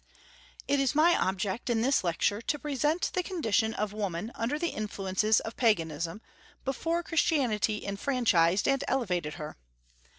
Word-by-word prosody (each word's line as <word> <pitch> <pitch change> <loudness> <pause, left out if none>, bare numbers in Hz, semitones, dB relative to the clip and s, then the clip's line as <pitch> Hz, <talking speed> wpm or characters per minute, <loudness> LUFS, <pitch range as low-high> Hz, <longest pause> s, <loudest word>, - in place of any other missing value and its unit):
It 285 - +2
is 275 0 +1
my 335 +3 +5
object 190 +5 -1
in 230 -2 +2
this 265 -2 +2
lecture 180 +5 0
to 295 - -1
present 300 +5 0
the 365 - +1
condition 225 - 0
of 210 -1 -2
woman 205 0 -3
under 245 +6 -2
the 340 +2 -1
influences 210 0 0
of 225 - -7
Paganism, 165 - 0 0.4
before 330 +6 -1
Christianity 255 -11 +1
enfranchised 200 -5 +2
and 275 -1 +2
elevated 180 - -1
her. 150 -3 -7
225 Hz, 140 wpm, -29 LUFS, 195-280 Hz, 0.4 s, my